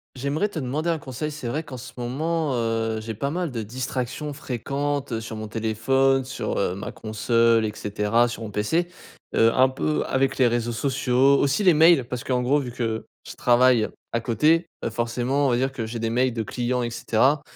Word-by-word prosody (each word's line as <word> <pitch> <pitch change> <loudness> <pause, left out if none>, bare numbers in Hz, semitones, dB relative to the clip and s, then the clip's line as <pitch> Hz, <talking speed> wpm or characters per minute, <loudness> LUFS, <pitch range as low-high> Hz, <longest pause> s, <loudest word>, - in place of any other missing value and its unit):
J'aimerais 140 +10 -1
te 165 - -5
demander 150 +5 -1
un 165 - 0
conseil, 140 +2 -5
c'est 145 -5 -6
vrai 150 +7 -2
qu'en 130 -5 -9
ce 125 - -9
moment, 150 +5 -1
heu, 115 -2 -1
j'ai 110 +1 -5
pas 140 +6 -2
mal 175 +1 -2
de 115 -3 -4
distractions 130 +5 -4
fréquentes 140 -1 -3
sur 110 0 -7
mon 110 0 -6
téléphone, 130 +5 +1
sur 130 - -3
heu, 90 - 0
ma 100 - -6
console 115 +1 +2
et 105 - -1
cetera, 105 +4 +1
sur 115 -1 -6
mon 110 - -5
PC. 135 - 0 0.5
Heu, 115 - +5
un 130 0 +5
peu 150 +3 -1
avec 135 0 0
les 130 -2 +4
réseaux 120 0 -1
sociaux, 135 +2 +2
aussi 140 +8 +1
les 180 - +7
mails, 160 -4 +5
parce 125 -1 -5
qu'en 125 -1 0
gros 135 +4 +3
vu 125 -3 -5
que, 115 -2 -3 0.2
je - - -9
travaille, 120 -2 +4 0.2
à 115 - 0
côté, 155 - +2 0.2
heu, - - -1
forcément 120 +5 0
on - - +2
va 120 - +2
dire 135 +2 0
que 115 -4 -4
j'ai 115 +1 -5
des 115 0 -1
mails 125 +1 +1
de 115 - -1
clients 125 +3 -2
et 120 - -2
cetera 130 +6 +2
125 Hz, 210 wpm, -24 LUFS, 115-140 Hz, 0.5 s, les